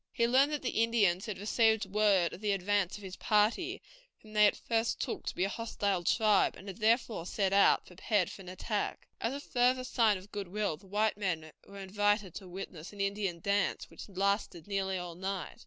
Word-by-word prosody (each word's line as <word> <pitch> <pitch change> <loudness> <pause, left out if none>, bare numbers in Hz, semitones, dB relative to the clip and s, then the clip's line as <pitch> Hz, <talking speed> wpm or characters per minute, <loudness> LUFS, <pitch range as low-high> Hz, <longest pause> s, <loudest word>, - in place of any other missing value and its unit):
He 235 - +1
learned 265 +5 +4
that 295 -2 -3
the 245 -3 0
Indians 205 -5 +2
had 215 - -4
received 220 +2 +2
word 195 -3 +2
of 185 - -9
the 210 -1 +1
advance 195 0 0
of 205 - -13
his 190 -1 -7
party, 235 - +1 0.3
whom 215 -1 -16
they 210 -1 +6
at - - +1
first 230 0 -1
took - - -4
to - - -3
be 180 - 0
a - - +2
hostile 200 -4 -2
tribe, 210 +2 +3
and 195 - -12
had 195 - -7
therefore 225 -4 +1
set 195 -1 0
out, 200 - +5
prepared 185 +1 -1
for - - -10
an 180 - -10
attack. 205 +3 -3
As 230 - -1
a - - -4
further 255 -2 +1
sign 225 -5 +2
of 190 +3 -14
good 200 -2 -4
will, 205 -2 -1
the 195 +5 -19
white 210 +2 +1
men 165 -6 -2 0.2
were 200 - -11
invited 205 -1 0
to 195 - -8
witness 175 -2 -8
an 205 - -13
Indian 195 -3 -1
dance, 200 +1 0
which - - -10
lasted 195 -3 -1
nearly 195 -2 -1
all 180 -1 -5
night. 190 +1 -5
205 Hz, 210 wpm, -31 LUFS, 190-220 Hz, 0.3 s, they